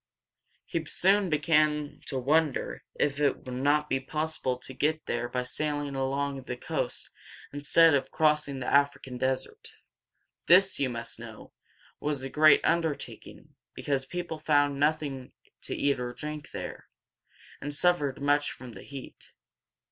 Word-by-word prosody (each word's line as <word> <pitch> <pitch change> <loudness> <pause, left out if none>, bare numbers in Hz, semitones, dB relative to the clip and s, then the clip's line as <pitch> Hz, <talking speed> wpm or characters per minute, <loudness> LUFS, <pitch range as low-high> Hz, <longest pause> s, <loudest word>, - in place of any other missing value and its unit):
He 165 - -2
soon 195 +4 +2
began 150 -1 +2
to 135 - -3
wonder 150 +2 +1
if 140 -1 0
it 145 -2 +1
would 130 - -6
not 145 +4 +2
be 135 - 0
possible 150 -2 -2
to 130 +1 -9
get 155 +4 0
there 120 0 -2
by 125 -1 -1
sailing 145 +2 -1
along 135 +1 -1
the 125 -1 -6
coast - - -3 0.4
instead 155 +3 +5
of 135 -2 +1
crossing 150 -3 +1
the 125 - -4
African 140 -3 +1
desert. 130 0 -3 0.7
This, 190 +1 +5
you 135 -2 +1
must 115 -1 -6
know, 115 -2 -11 0.5
was 145 -3 -2
a 135 - -4
great 155 -1 +6
undertaking, 165 -3 -2 0.2
because 135 -2 -2
people 175 -1 -4
found 145 -2 +2
nothing 145 -3 0 0.3
to - - -3
eat 140 -2 +1
or 125 0 -4
drink 150 +2 -6
there, - - -7 0.7
and 145 - -4
suffered 145 -3 +1
much 145 +1 +2
from 125 -2 -10
the 95 - -11
heat. 135 -2 -11
145 Hz, 145 wpm, -29 LUFS, 130-155 Hz, 0.7 s, great